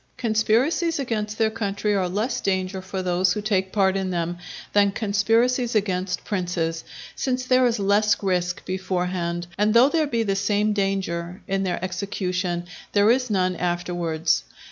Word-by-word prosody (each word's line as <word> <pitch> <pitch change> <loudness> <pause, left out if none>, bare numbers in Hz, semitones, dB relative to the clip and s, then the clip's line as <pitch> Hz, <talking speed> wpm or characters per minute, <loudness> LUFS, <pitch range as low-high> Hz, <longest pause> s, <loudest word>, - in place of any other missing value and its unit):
Conspiracies 240 +9 +1
against 215 -6 -2
their 220 -1 +2
country 210 -1 -1
are 190 -3 +1
less 215 +7 -1
danger 190 0 -1
for 190 0 -5
those 180 0 +2
who 210 - -3
take 190 -3 0
part 195 -2 +2
in 190 -1 -1
them 175 0 -2 0.3
than 200 -1 +4
conspiracies 230 +4 +1
against 190 -3 -1
princes; 175 -4 -2 0.3
since 255 -1 -1
there 255 0 +4
is 235 -1 0
less 205 +1 +3
risk 180 -2 -1
beforehand, 180 -2 -2
and 210 +2 +2
though 250 +4 +7
there 315 -1 +1
be 230 -4 0
the 195 -2 0
same 205 +2 +1
danger 190 -3 -2
in 195 0 0
their 185 -2 -1
execution, 185 -2 -2 0.3
there 205 +2 +5
is 250 0 +1
none 185 -3 +1
afterwards. 175 -2 -1
195 Hz, 155 wpm, -24 LUFS, 180-215 Hz, 0.3 s, though